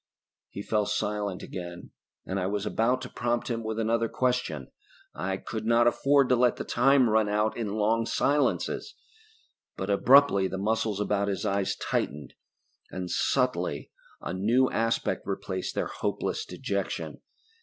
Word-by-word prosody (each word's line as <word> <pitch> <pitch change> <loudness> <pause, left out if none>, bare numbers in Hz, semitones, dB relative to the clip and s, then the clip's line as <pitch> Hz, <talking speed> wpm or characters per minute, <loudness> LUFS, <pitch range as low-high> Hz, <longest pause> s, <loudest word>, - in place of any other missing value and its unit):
He 100 - -7
fell 105 -1 0
silent 105 -2 -2
again, 85 -1 -8 0.3
and 95 +1 -2
I 90 - -1
was 100 +1 -2
about 125 +4 +1
to 125 - -6
prompt 120 0 -2
him 115 -1 -2
with 110 0 -3
another 115 +1 +1
question 125 - -1 0.4
I 95 +1 -2
could 110 +2 -5
not 115 0 +4
afford 140 +2 +3
to 125 - +5
let 125 0 +3
the - - -5
time 135 +1 +4
run 110 -1 +2
out 105 +1 +1
in 105 -3 -3
long 115 +2 +1
silences 145 - 0 0.8
but 95 +2 -2
abruptly 110 -2 +5
the 95 - -4
muscles 105 0 0
about 105 -1 0
his 100 +2 -2
eyes 100 -1 0
tightened 75 0 -3 0.6
and 90 -1 -5
subtly - - 0 0.3
a - - -5
new 115 +8 +2
aspect 115 +1 -1
replaced - - -3
their - - 0
hopeless 440 - -3
dejection. - - -4
110 Hz, 150 wpm, -28 LUFS, 100-120 Hz, 0.8 s, to